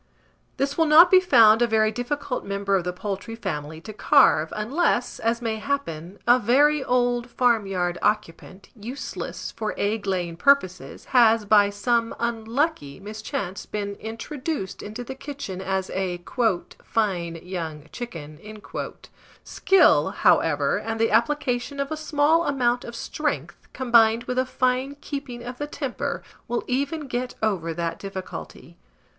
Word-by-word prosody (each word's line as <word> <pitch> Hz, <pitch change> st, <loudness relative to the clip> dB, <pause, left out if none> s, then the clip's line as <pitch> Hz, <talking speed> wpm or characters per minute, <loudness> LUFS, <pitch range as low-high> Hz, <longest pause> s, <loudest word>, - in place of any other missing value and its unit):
This 280 Hz, +3 st, -1 dB
will 325 Hz, -, +4 dB
not 330 Hz, +4 st, +8 dB
be 375 Hz, -, +8 dB
found 230 Hz, -11 st, +6 dB
a 240 Hz, -, +4 dB
very 215 Hz, -1 st, +2 dB
difficult 250 Hz, +3 st, -3 dB
member 200 Hz, 0 st, -1 dB
of 185 Hz, -, +1 dB
the 180 Hz, -, -1 dB
poultry 200 Hz, +4 st, -5 dB
family 160 Hz, -7 st, -5 dB
to 215 Hz, -, -9 dB
carve, 215 Hz, -, +4 dB
unless, 245 Hz, +3 st, 0 dB
as 230 Hz, +1 st, -1 dB
may 220 Hz, -1 st, -1 dB
happen, 205 Hz, -, -4 dB
a 245 Hz, +1 st, +6 dB
very 285 Hz, +6 st, +3 dB
old 245 Hz, -1 st, +1 dB
farmyard 195 Hz, -9 st, +1 dB
occupant, 190 Hz, -1 st, -2 dB
useless 240 Hz, +6 st, -6 dB
for 215 Hz, -1 st, -4 dB
egg 205 Hz, 0 st, -1 dB
laying 175 Hz, -3 st, -2 dB
purposes, 195 Hz, -6 st, +1 dB
has, 230 Hz, -3 st, +5 dB
by 205 Hz, -1 st, +5 dB
some 230 Hz, +3 st, 0 dB
unlucky 230 Hz, -, -2 dB
mischance, 200 Hz, -2 st, -5 dB
been 200 Hz, -1 st, -4 dB
introduced 245 Hz, -, -5 dB
info 215 Hz, +4 st, -6 dB
the 265 Hz, -, -6 dB
kitchen 265 Hz, -9 st, -7 dB
as 190 Hz, 0 st, -2 dB
a 185 Hz, -2 st, -2 dB, 0.6 s
"fine 180 Hz, -7 st, -1 dB
young 165 Hz, -5 st, -5 dB
chicken." 155 Hz, -11 st, -8 dB, 1.0 s
Skill, 385 Hz, 0 st, +4 dB
however, -, -, +2 dB
and 225 Hz, 0 st, -4 dB
the 225 Hz, -, +2 dB
application 250 Hz, +3 st, 0 dB
of 280 Hz, +1 st, -2 dB
a -, -, -1 dB
small 310 Hz, +2 st, +2 dB
amount 245 Hz, -3 st, +1 dB
of 235 Hz, -, -8 dB
strength, 300 Hz, +5 st, -4 dB
combined 235 Hz, -2 st, +4 dB
with 250 Hz, +1 st, -2 dB
a 255 Hz, -, 0 dB
fine 255 Hz, +2 st, 0 dB
keeping 275 Hz, -5 st, -6 dB
of 245 Hz, +1 st, -7 dB
the 290 Hz, -, -3 dB
temper, 275 Hz, -4 st, -4 dB, 0.2 s
will 240 Hz, -, -2 dB
even 280 Hz, +5 st, -1 dB
get 250 Hz, -1 st, -4 dB
over 185 Hz, -6 st, 0 dB
that 165 Hz, 0 st, -3 dB
difficulty. 195 Hz, -2 st, -8 dB
230 Hz, 140 wpm, -24 LUFS, 195-260 Hz, 1.0 s, not